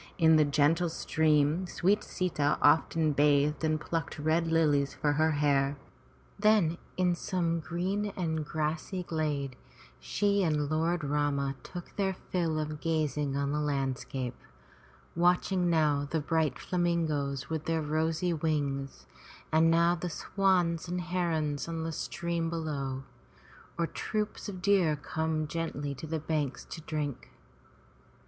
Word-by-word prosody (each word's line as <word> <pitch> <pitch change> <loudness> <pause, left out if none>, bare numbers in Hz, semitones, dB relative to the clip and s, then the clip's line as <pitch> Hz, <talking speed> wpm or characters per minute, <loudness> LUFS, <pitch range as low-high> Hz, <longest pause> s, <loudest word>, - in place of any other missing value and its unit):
In 160 -2 +6
the 155 - +6
gentle 150 +4 +2
stream 160 +2 +2
sweet 195 +4 +1
Sita 150 -6 0
often 160 +1 +4
bathed 145 +1 +3
and 155 -1 +1
plucked 165 +2 -3
red 160 +3 +1
lilies 150 -4 +2
for 145 -1 +1
her 155 +1 +2
hair, 140 -1 +2 0.6
then 205 -6 +3 0.2
in 180 -1 +3
some 170 -1 -1
green 185 +6 -2
and 160 -4 -1
grassy 155 +5 -2
glade 150 -5 -2 0.4
she 200 -1 +1
and 150 -4 0
Lord 165 +2 +1
Rama 140 -1 0
took 175 +5 -9
their 190 -2 0
fill 170 -4 -2
of 155 -1 -3
gazing 150 -3 0
on 140 0 0
the 150 - 0
land 135 -3 -1
scape, 125 -2 -5 0.7
watching 180 +1 +2
now 150 -3 +2
the 160 - 0
bright 155 -2 0
flamingoes 160 -6 -1
with 160 -1 -2
their 165 -1 0
rosy 160 +3 0
wings, 145 -4 -2 0.5
and 160 +1 +5
now 170 +1 +4
the 175 0 -3
swans 180 -1 +1
and 180 +1 -2
herons 165 -5 -1
on 165 -1 -3
the 165 - -2
stream 170 +1 -2
below, 140 -5 -3 0.7
or 170 - +1
troops 210 +4 -3
of 185 -3 -7
deer 190 -6 +4
come 155 +1 -2
gently 150 -3 -3
to 140 +4 -8
the 160 +1 -1
banks 150 -3 -2
to 160 - -8
drink. 150 -3 -4
160 Hz, 140 wpm, -30 LUFS, 145-170 Hz, 0.7 s, In